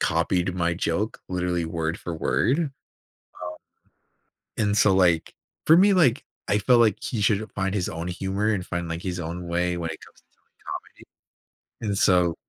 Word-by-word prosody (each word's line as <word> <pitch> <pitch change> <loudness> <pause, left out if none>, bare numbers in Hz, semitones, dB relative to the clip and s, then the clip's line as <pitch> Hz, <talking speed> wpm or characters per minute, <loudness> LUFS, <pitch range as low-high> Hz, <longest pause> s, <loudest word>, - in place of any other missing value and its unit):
copied 85 +2 +1
my 85 -1 0
joke 95 +5 -2
literally 90 -2 -1
word 80 0 -2
for 85 - -5
word. 80 - +1
Um, 160 -4 -1 1.9
and 105 -1 +1
so, 100 -1 +5
like, 90 -4 +2 0.3
for 160 - +8
me, 200 +3 +6
like, 140 -9 +3 0.2
I 105 - +3
felt 120 +4 +4
like 110 -4 +3
he 115 - -3
should 105 +1 +1
find 95 0 -2
his 95 -4 -1
own 85 +1 -5
humor 95 +4 -2
and 95 -3 -3
find, 85 -1 -3
like, 85 +1 -4
his 90 -1 -3
own 85 +1 -5
way 90 +1 0
when 85 -1 -3
it 80 - -6
comes - - -20
to - - -43
telling - - -42 1.3
comedy. 110 - -3
And 100 - -1
so 90 -4 +3
90 Hz, 180 wpm, -25 LUFS, 85-105 Hz, 1.9 s, for